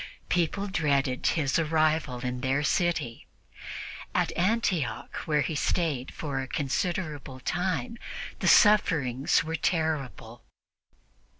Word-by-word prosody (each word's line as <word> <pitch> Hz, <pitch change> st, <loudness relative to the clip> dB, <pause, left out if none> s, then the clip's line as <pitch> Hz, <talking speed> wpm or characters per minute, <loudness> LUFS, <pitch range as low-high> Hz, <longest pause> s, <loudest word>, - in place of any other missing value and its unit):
People 180 Hz, +3 st, +1 dB
dreaded 140 Hz, -8 st, 0 dB
his 150 Hz, -2 st, +1 dB
arrival 155 Hz, -5 st, +1 dB
in 125 Hz, 0 st, -3 dB
their 135 Hz, +2 st, +1 dB
city; 155 Hz, -7 st, 0 dB, 0.9 s
at -, -, +1 dB
Antioch, 180 Hz, -, 0 dB
where 150 Hz, -2 st, +2 dB
he 160 Hz, -, -2 dB
stayed 150 Hz, -4 st, -1 dB
for 140 Hz, -4 st, -4 dB
a 130 Hz, -, -5 dB
considerable 145 Hz, -1 st, -2 dB
time, 185 Hz, -, -2 dB, 0.4 s
the -, -, -1 dB
sufferings 150 Hz, -, +4 dB
were 160 Hz, 0 st, -3 dB
terrible. 150 Hz, -, -2 dB
155 Hz, 105 wpm, -28 LUFS, 135-175 Hz, 0.9 s, sufferings